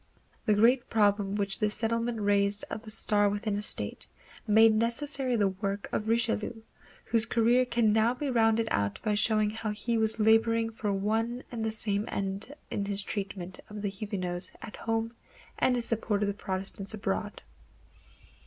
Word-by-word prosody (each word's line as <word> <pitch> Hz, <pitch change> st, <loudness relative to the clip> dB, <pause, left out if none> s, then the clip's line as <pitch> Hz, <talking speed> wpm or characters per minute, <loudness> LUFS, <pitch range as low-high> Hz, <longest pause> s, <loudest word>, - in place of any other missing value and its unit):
The 210 Hz, -, +4 dB
great 240 Hz, +4 st, +3 dB
problem 205 Hz, -2 st, +2 dB
which 200 Hz, -1 st, -1 dB
this 210 Hz, 0 st, +1 dB
settlement 230 Hz, +1 st, -1 dB
raised 200 Hz, 0 st, +1 dB
of 220 Hz, -, -5 dB
a -, -, -6 dB
state 205 Hz, -1 st, +3 dB
within 205 Hz, 0 st, -2 dB
a 205 Hz, -, -2 dB
state, 210 Hz, -, -2 dB, 0.4 s
made 220 Hz, +1 st, +6 dB
necessary 250 Hz, +3 st, 0 dB
the 205 Hz, -3 st, +2 dB
work 195 Hz, +1 st, -4 dB
of 215 Hz, -, -2 dB
Richelieu, 225 Hz, -1 st, 0 dB, 0.4 s
whose 230 Hz, 0 st, +1 dB
career 240 Hz, +2 st, +3 dB
can 235 Hz, -3 st, +2 dB
now 225 Hz, +3 st, +3 dB
be 290 Hz, +3 st, -3 dB
rounded 225 Hz, -1 st, +2 dB
out 100 Hz, 0 st, 0 dB
by 215 Hz, -, +1 dB
showing 215 Hz, 0 st, +2 dB
how 220 Hz, 0 st, -4 dB
he 225 Hz, +2 st, -1 dB
was 220 Hz, 0 st, +5 dB
laboring 225 Hz, +1 st, +3 dB
for 215 Hz, -2 st, -3 dB
one 225 Hz, +5 st, -1 dB
and 230 Hz, -2 st, -4 dB
the 220 Hz, -, 0 dB
same 210 Hz, -1 st, +1 dB
end 195 Hz, +5 st, -2 dB, 0.2 s
in 200 Hz, -, -1 dB
his 200 Hz, 0 st, 0 dB
treatment 190 Hz, -3 st, -5 dB
of 210 Hz, 0 st, -7 dB
the 200 Hz, -, 0 dB
Huguenots 190 Hz, -3 st, -4 dB
at 220 Hz, -, -9 dB
home 225 Hz, 0 st, -2 dB, 0.5 s
and 255 Hz, -, +3 dB
his 240 Hz, -1 st, -2 dB
support 215 Hz, -2 st, -1 dB
of -, -, +1 dB
the 200 Hz, -, -1 dB
Protestants 195 Hz, +1 st, -3 dB
abroad. 200 Hz, 0 st, -3 dB
215 Hz, 170 wpm, -29 LUFS, 205-230 Hz, 0.5 s, made